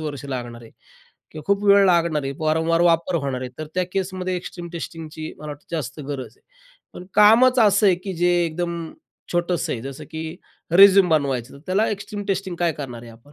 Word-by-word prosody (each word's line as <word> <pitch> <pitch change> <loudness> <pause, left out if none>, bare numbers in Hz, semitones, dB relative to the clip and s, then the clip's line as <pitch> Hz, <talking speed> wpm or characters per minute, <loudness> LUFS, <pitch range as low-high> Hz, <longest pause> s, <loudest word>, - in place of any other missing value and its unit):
वर्ष 145 -3 -5
लागणार 120 -3 -6
आहे. 115 - -14 0.6
किंवा 155 - -9
खूप 200 +1 +1
वेळ 200 0 +6
लागणार 170 -4 +2
आहे, 135 - -3
वारंवार 160 +1 +1
वापर 170 +1 +2
होणार 130 -2 -2
आहे, 130 -1 -5
तर 155 - -5
त्या 185 0 +1
केसमध्ये 185 -1 -2
एक्स्ट्रीम 175 0 -7
टेस्टिंगची 160 -2 -7
मला 150 0 -8
वाटतं 145 0 -9
जास्त 140 -1 -5
गरज 135 -5 -6
आहे. - - -33 0.5
पण 180 - -9
कामच 240 +5 +6
असं 210 -1 +5
आहे, 185 - +5
की 190 +1 -6
जे 175 +1 +2
एकदम 170 +1 -3 0.5
छोटंसं 175 0 0
आहे, 115 - -4
जसं 135 +3 -8
की 160 +1 -6 0.4
रिझ्यूम 195 0 +7
बनवायचं, 135 -6 0
तर 140 - -12
त्याला 195 +4 +1
एक्स्ट्रीम 205 0 -5
टेस्टिंग 190 -2 -2
काय 170 -1 +1
करणार 125 -6 -7
आहे 115 - -11
आपण? 115 +6 -19
165 Hz, 195 wpm, -22 LUFS, 145-185 Hz, 0.6 s, रिझ्यूम